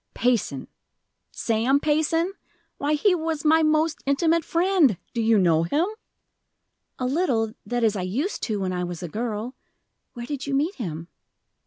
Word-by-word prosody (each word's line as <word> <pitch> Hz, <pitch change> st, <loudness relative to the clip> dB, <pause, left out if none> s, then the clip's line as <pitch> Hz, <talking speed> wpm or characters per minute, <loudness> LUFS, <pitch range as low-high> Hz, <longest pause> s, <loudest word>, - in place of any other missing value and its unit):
"Payson 230 Hz, -, 0 dB, 0.6 s
Sam 235 Hz, +5 st, +1 dB
Payson? 315 Hz, +4 st, +1 dB, 0.5 s
Why, 295 Hz, +2 st, +1 dB
he 385 Hz, +6 st, +3 dB
was 325 Hz, -3 st, -2 dB
my 320 Hz, +1 st, +5 dB
most 310 Hz, 0 st, +2 dB
intimate 325 Hz, +4 st, +2 dB
friend! 335 Hz, -, +3 dB, 0.2 s
Do 235 Hz, -, -1 dB
you 225 Hz, 0 st, +4 dB
know 170 Hz, -4 st, +4 dB
him?" 290 Hz, -, +1 dB, 1.1 s
"A 255 Hz, -, -2 dB
little 250 Hz, -7 st, 0 dB
that 240 Hz, -1 st, -1 dB
is, 220 Hz, -2 st, +3 dB
I 190 Hz, -, -2 dB
used 245 Hz, -, -2 dB
to, 215 Hz, -3 st, -2 dB
when 185 Hz, -1 st, -1 dB
I 180 Hz, 0 st, -2 dB
was 175 Hz, 0 st, -5 dB
a -, -, -3 dB
girl. 225 Hz, +5 st, -4 dB, 0.6 s
Where 240 Hz, 0 st, -6 dB
did 285 Hz, +1 st, -5 dB
you 275 Hz, -, 0 dB
meet 305 Hz, +7 st, +1 dB
him?" 170 Hz, -, -6 dB
255 Hz, 160 wpm, -24 LUFS, 215-315 Hz, 1.1 s, my